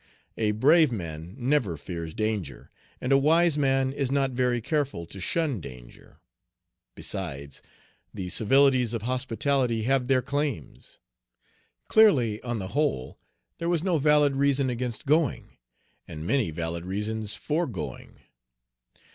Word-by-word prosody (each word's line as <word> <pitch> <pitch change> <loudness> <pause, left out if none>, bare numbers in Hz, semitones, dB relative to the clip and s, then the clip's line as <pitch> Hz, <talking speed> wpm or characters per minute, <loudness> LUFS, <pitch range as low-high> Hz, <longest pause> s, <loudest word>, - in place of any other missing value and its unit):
A 110 -2 0
brave 150 +6 +5
man 85 -3 -6
never 125 - 0
fears 85 0 -6
danger, 105 -10 -3 0.3
and 125 - -3
a 135 - +6
wise 165 +3 +4
man 135 -2 +1
is 140 -2 -2
not 135 -1 +1
very 125 -1 +1
careful 140 - -2
to 95 - -10
shun 145 - -1
danger. 60 -4 -13 0.8
Besides, 70 0 -5 0.5
the 90 -2 -6
civilities 125 +3 +3
of 110 - -4
hospitality 125 -1 0
have 130 +1 +1
their 130 -1 +2
claims. 145 - -4 0.9
Clearly, 135 - +4
on 120 -2 -3
the 95 -3 -5
whole, 125 - -1 0.4
there 170 - -1
was 170 -2 +1
no 180 -4 +1
valid 150 -1 +4
reason 140 -2 +2
against 120 +2 -4
going, 150 -1 0 0.5
and 80 0 -7
many 130 -2 +1
valid 85 +1 -4
reasons 105 +3 -3
for 160 +7 -1
going. 80 - -7
125 Hz, 130 wpm, -26 LUFS, 100-140 Hz, 0.9 s, a